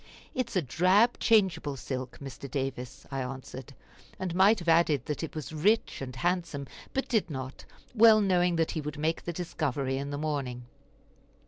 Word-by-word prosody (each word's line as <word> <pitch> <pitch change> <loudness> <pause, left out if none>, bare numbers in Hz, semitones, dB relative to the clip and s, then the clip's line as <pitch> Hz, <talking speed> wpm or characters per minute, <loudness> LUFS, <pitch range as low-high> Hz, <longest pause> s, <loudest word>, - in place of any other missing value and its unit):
"It 255 -2 -1
is - - -9
a 185 - +2
drab 185 - +3
changeable 180 -10 +2
silk, 130 -1 -5
Mr. 140 0 -8
Davis," 135 0 -4
I 135 -1 -2
answered; 130 +1 -7 0.4
and 185 -2 -3
might 195 +5 +5
have 175 -3 -8
added 160 -6 +3
that 150 - -3
it 160 - -5
was 155 0 -6
rich 205 +6 +1
and 130 -2 -6
handsome, 170 -3 -1 0.3
but 270 - -2
did 220 -7 +1
not, 130 -2 -6 0.3
well 225 -2 +7
knowing 180 -3 +2
that 165 -1 +1
he 155 - -3
would 150 0 -6
make 160 +2 -1
the 175 - -2
discovery 140 -6 -2
in 140 +1 -4
the 145 - -3
morning. 140 -5 -3
155 Hz, 180 wpm, -29 LUFS, 135-180 Hz, 0.4 s, well